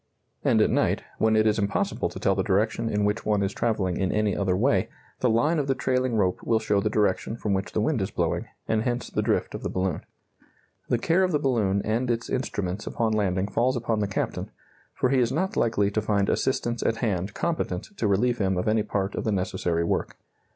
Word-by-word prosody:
And - - +4
at - - +1
night, - - +1 0.2
when 110 0 +3
it 110 0 +4
is 110 0 +2
impossible 100 0 0
to - - -8
tell - - +2
the - - 0
direction 110 +3 +1
in 105 -1 +1
which 105 +2 0
one 105 -2 +1
is 95 - -1
travelling 100 -6 0
in 95 -1 0
any 105 -1 +1
other 95 -2 +1
way, 105 -4 +2 0.3
the 125 - +2
line 145 +9 +2
of 140 - -1
the 135 - +1
trailing 130 -2 0
rope 95 -4 +1
will 115 - +2
show 105 -2 +1
the 105 - 0
direction 105 +1 0
from 105 -3 -1
which 95 0 -2
the - - +1
wind - - +1
is - - -1
blowing, - - -1 0.2
and 110 -1 +1
hence 120 +1 -2
the - - 0
drift - - 0
of - - -5
the - - -3
balloon. 95 -3 -1 0.9
The 120 - +3
care 165 +10 +2
of 185 - +1
the 150 - +3
balloon 110 -9 +1
and 115 +4 0
its 115 0 -1
instruments 105 -6 -2
upon 115 -2 0
landing 95 -2 +1
falls 125 +5 +1
upon 115 -2 -1
the 105 - 0
captain, 95 - -3 0.5
for 130 - +1
he 135 0 +3
is 120 -2 +2
not 190 +7 -1
likely 105 -3 +2
to 110 - 0
find 100 -2 +1
assistants 120 -3 0
at 115 - +1
hand 100 -4 -2
competent 165 - -2
to 110 - 0
relieve 120 +5 +2
him 95 -2 +1
of 90 - -1
any 110 0 +3
part 100 -1 -2
of - - -3
the 110 - 0
necessary 90 -3 -1
work. 85 - -2
110 Hz, 230 wpm, -26 LUFS, 100-120 Hz, 0.9 s, And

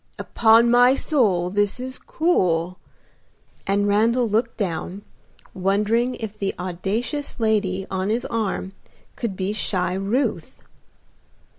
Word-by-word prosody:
"Upon 230 +1 +4
my 245 +2 +6
soul, 200 - +1
this 205 +3 0
is 260 +1 -6
cool," 185 - 0 0.9
and 200 +1 +1
Randal 230 +4 +2
looked 225 +3 -1
down, 185 0 -4 0.5
wondering 210 +6 +1
if 215 -2 -6
the 200 -2 -3
audacious 200 - -3
lady 205 -4 0
on 190 +1 -1
his 235 +3 -1
arm 210 -4 -2 0.4
could 225 -6 -4
be 190 +2 -2
shy 185 -4 -1
Ruth. 200 +8 -1
205 Hz, 115 wpm, -22 LUFS, 190-235 Hz, 0.9 s, my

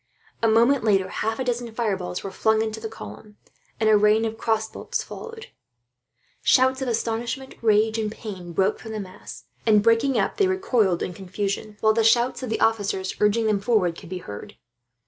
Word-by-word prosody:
A 230 - +3
moment 235 +4 +4
later 195 -4 +2
half 220 +4 -2
a 260 - -2
dozen 240 -1 -2
fireballs 195 -6 -2
were 195 - -5
flung 220 +1 +2
into 220 0 -4
the 220 0 -5
column, 210 -1 -11 0.4
and 220 - +2
a 215 - +6
rain 210 +2 +4
of 225 0 -3
crossbow 220 -1 -2
bolts - - -3
followed. 460 -1 -9 0.9
Shouts 260 +1 +3
of 265 - -2
astonishment, 235 +3 -2
rage, 220 0 +3
and 215 -1 -2
pain 190 -6 -8
broke 190 +4 +1
from 220 - -8
the 215 - -3
mass 190 -1 -10 0.2
and, 210 -2 +4
breaking 230 +4 +3
up, - - 0
they 395 - +3
recoiled 245 - +1
in 180 - -4
confusion; 200 +3 -4
while 220 0 +4
the 225 0 +2
shouts 235 +4 +3
of 255 - -4
the 225 - -1
officers, 200 -4 0
urging 210 +2 +2
them 210 -2 +2
forward, 200 -6 +1
could - - -12
be 185 - -4
heard. 105 -12 -9
220 Hz, 190 wpm, -24 LUFS, 205-230 Hz, 0.9 s, a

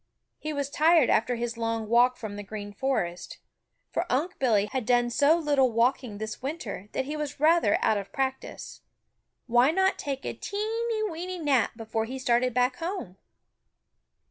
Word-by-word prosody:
He 310 - -4
was 285 -1 -3
tired 315 -1 +4
after 245 +3 +2
his 235 0 -3
long 225 -1 -2
walk 245 +3 +4
from 215 -3 -6
the 205 - -5
Green 205 0 -7
Forest, 195 -8 -2 0.5
for - - -2
Unc' 305 +9 -1
Billy 220 -6 +3
had 260 -2 -1
done 240 +1 +2
so 285 +6 +4
little 285 -6 +2
walking 235 -1 +1
this 220 +1 -6
winter 245 - -5
that 265 - -1
he 295 +3 -4
was 295 -2 -4
rather 310 -8 +4
out 215 - +3
of 200 - -9
practice. 265 -1 -4 0.6
Why 240 +3 +4
not 380 +4 +2
take 275 -2 -4
a - - -2
teeny, 440 +2 -2
weeny 360 +1 -5
nap 275 -9 +1
before 220 -1 -2
he 260 +4 -6
started 250 0 +2
back 250 +1 +1
home? 330 - -5
255 Hz, 170 wpm, -27 LUFS, 225-305 Hz, 0.6 s, tired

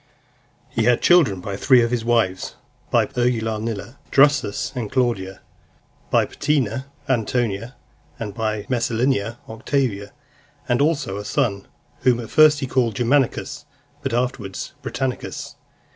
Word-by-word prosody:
XXVII. 115 - -1
He - - +2
had 120 - +3
children 150 - +5
by 100 +1 -4
three 125 +4 +5
of 115 - -1
his 120 -2 0
wives: 115 -6 0 0.3
by - - +3
Urgulanilla, 115 -1 -2
Drusus 140 -7 +3
and 115 -5 -4
Claudia; 115 -7 -1 0.7
by - - +3
Paetina, 130 -4 -1 0.2
Antonia; 120 -1 -1 0.4
and 105 -3 -5
by 110 -1 -2
Messalina, 120 -2 0
Octavia, 110 -3 -2 0.6
and 120 +1 +2
also 145 -10 0
a 105 - -5
son, 105 -5 -1 0.3
whom 125 -1 +3
at 115 - -7
first 155 -1 +6
he - - 0
called 125 -4 0
Germanicus, 140 +4 0 0.4
but 135 - -2
afterwards 120 -5 -2
Britannicus. 130 -2 -4
120 Hz, 130 wpm, -22 LUFS, 110-130 Hz, 0.7 s, first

